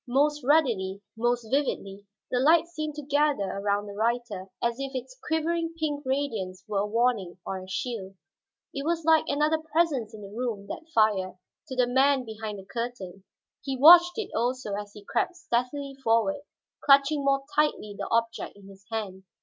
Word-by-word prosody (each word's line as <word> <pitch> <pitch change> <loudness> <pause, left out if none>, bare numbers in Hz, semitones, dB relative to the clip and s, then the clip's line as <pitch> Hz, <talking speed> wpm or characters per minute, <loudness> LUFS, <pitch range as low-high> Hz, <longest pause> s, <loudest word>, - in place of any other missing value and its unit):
Most 290 +3 +2
ruddily, 235 -10 +2 0.2
most 240 0 0
vividly, 205 -8 -1 0.2
the 250 - +2
light 320 +5 +5
seemed 310 -3 -5
to 300 - -6
gather 290 -4 +2
around 200 +1 -1
the 205 - -8
writer, 220 -3 -1
as 235 +1 -1
if 275 0 -4
its 255 0 -5
quivering 330 +1 0
pink 295 -2 -2
radiance 215 -10 -2
were 205 -2 -1
a 205 - 0
warning 225 -5 0
or 190 - -3
a 185 - -10
shield. 195 -1 -4 0.6
It 275 - -4
was 330 0 -1
like 320 -1 +5
another 300 +2 +2
presence 315 -8 0
in 210 - -10
the 200 +1 -10
room, 230 -5 -3
that 325 0 -7
fire, 205 - +2 0.3
to 260 - -6
the 250 -1 +3
man 265 +1 +3
behind 220 -1 -6
the 190 - -10
curtain. 205 -6 -6 0.4
He 270 -1 -3
watched 350 - +8
it 435 -3 -3
also 240 -2 -1
as 205 0 -5
he 205 -1 -13
crept 360 - -1
stealthily 275 -1 -2
forward, 230 +5 +2 0.4
clutching 280 +1 +5
more 275 0 +2
tightly 295 -9 +1
the 200 -1 -5
object 230 0 -1
in 200 -1 -14
his 195 0 -15
hand. 195 -4 -4
245 Hz, 175 wpm, -27 LUFS, 205-290 Hz, 0.6 s, watched